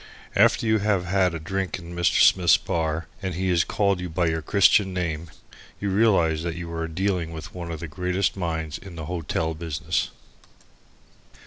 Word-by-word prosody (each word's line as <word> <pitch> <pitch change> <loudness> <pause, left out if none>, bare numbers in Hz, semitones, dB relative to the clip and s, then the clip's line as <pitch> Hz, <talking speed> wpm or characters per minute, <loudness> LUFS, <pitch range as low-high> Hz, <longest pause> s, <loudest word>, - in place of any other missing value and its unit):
After - - +4
you 110 0 +3
have 100 -3 +1
had 90 -1 +2
a - - -4
drink 95 +3 -3
in 85 -1 -10
Mr. 85 -5 +3
Smith's 90 -3 +6
bar, 80 -1 -2 0.2
and 95 -3 -3
he 95 +1 -1
has 85 -2 +3
called 100 -3 +1
you 90 0 -4
by 85 +2 0
your 80 -1 0
Christian 100 +2 +3
name, 85 -2 -3 0.5
you 100 -1 -2
realize 95 -7 +3
that 85 0 -3
you 85 -1 -6
are 80 0 -2
dealing 90 0 -1
with 80 0 -8
one 85 -2 -6
of 80 -1 -5
the 85 - -4
greatest 90 +4 -1
minds 80 -4 -3
in 95 -3 -11
the 80 -2 -6
hotel 80 -1 -2
business. 80 -3 -2
85 Hz, 185 wpm, -24 LUFS, 80-95 Hz, 0.5 s, Smith's